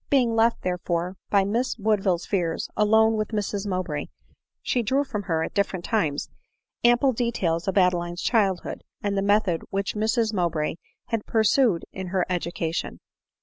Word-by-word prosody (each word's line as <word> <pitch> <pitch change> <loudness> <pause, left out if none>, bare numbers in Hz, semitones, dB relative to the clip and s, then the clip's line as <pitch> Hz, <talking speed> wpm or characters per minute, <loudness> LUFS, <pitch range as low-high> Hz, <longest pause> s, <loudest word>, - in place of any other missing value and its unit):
Being 245 -5 +3
left 230 +1 +2
therefore, 180 0 -2
by 200 -1 +4
Miss 235 +6 -1
Woodville's 200 -5 +1
fears, 175 -5 -1
alone 220 +1 +4
with 215 -1 -1
Mrs 205 -2 -2
Mowbray, 180 -6 -2 0.6
she 245 - +1
drew 265 +6 +1
from 240 -7 -4
her, 165 -5 -1
at - - -5
different 195 -3 -1
times, 160 -11 0 0.6
ample 240 +3 +4
details 200 -8 -1
of 195 - 0
Adeline's 175 -2 +1
childhood, 195 -7 0 0.2
and 200 -1 0
the 195 - +1
method 200 -4 +2
which 195 0 -2
Mrs 220 +1 +1
Mowbray 170 -4 -1 0.3
had 225 -2 -2
pursued 220 -3 +3
jn 190 -1 -5
her 185 -1 +1
education. 170 -1 -2
200 Hz, 150 wpm, -25 LUFS, 175-220 Hz, 0.6 s, by